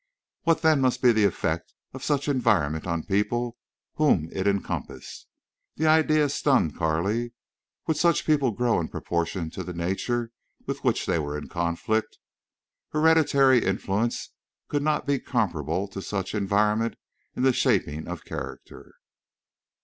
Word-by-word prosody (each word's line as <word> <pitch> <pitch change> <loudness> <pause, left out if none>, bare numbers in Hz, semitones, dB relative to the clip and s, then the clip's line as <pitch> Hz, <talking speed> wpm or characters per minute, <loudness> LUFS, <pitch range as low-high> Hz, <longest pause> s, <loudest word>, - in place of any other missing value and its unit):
What 165 0 +2
then 155 -3 +4
must 130 -1 +1
be 125 - +7
the 110 -2 +3
effect 85 -3 -2 0.2
of 130 0 -8
such 145 -1 0
environment 100 - +1
on 85 -2 -1
people 120 +4 -1 0.4
whom 95 - +3
it 95 +1 -1
encompassed? 100 -1 -3 0.5
The 160 - -1
idea 155 -1 +4
stunned 135 - +2
Carley. 95 +9 -1 0.5
Would 160 -2 0
such 170 +1 +2
people 145 -4 +3
grow 120 0 +1
in 80 - -2
proportion 85 -1 -3
to - - -6
the 90 - -6
nature 115 +7 -2 0.3
with - - -4
which - - +1
they 85 - +1
were 75 -1 -3
in 75 - -8
conflict? 85 +6 -1 0.7
Hereditary 150 -5 +4
influence 100 +4 -1 0.4
could 145 - 0
not 150 +1 0
be 140 -2 +1
comparable 90 - -1
to 100 - -6
such 95 -1 -4
environment 105 +2 +1 0.4
in 125 - -2
the 130 -1 +4
shaping 75 -8 0
of 90 -2 -7
character. - - -8
110 Hz, 140 wpm, -26 LUFS, 85-135 Hz, 0.7 s, be